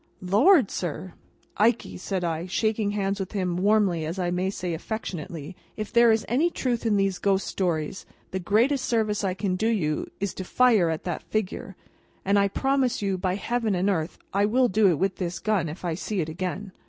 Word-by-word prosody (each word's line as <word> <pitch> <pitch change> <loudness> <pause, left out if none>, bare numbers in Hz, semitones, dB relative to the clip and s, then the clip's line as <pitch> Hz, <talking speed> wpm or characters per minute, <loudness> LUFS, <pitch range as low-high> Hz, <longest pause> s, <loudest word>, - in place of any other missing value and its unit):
"Lord, 225 - +5
sir?" 175 +1 -4 0.4
"Ikey!" 230 +2 +2
said 185 0 -3
I, 165 +1 -2
shaking 215 +2 0
hands 200 -1 -1
with 190 +1 -5
him 185 -4 -1
warmly: 190 -4 +2
I 175 +1 -2
may 180 +2 0
say 180 -3 -3
affectionately; 170 -3 -5 0.2
"if 215 -1 -5
there 235 -1 +6
is 220 0 +1
any 285 +9 +2
truth 240 -7 -1
in 210 -2 +3
these 195 -2 +1
ghost 195 -1 +1
stories, 170 -2 -2 0.2
the 190 - -2
greatest 235 +9 +2
service 215 -3 0
I 185 -2 0
can 190 -1 -1
do 215 +4 0
you, 165 -10 0
is, 200 -2 -2
to 190 - -5
fire 220 -4 +3
at 160 -1 -3
that 175 -3 -3
figure. 200 -2 -3 0.5
And 200 +1 +3
I 200 - +4
promise 265 +1 0
you, 195 -2 0
by 185 0 0
Heaven 225 0 -1
and 190 +3 +2
earth, 160 -3 -2 0.2
I 200 +1 +3
will 250 +3 +3
do 210 +1 +4
it 170 - +2
with 190 +4 0
this 175 -2 -3
gun 185 -3 0
if 165 +4 -8
I 170 - 0
see 195 +4 -3
it 160 -2 -1
again!" 185 +4 -4
195 Hz, 200 wpm, -26 LUFS, 180-215 Hz, 0.5 s, there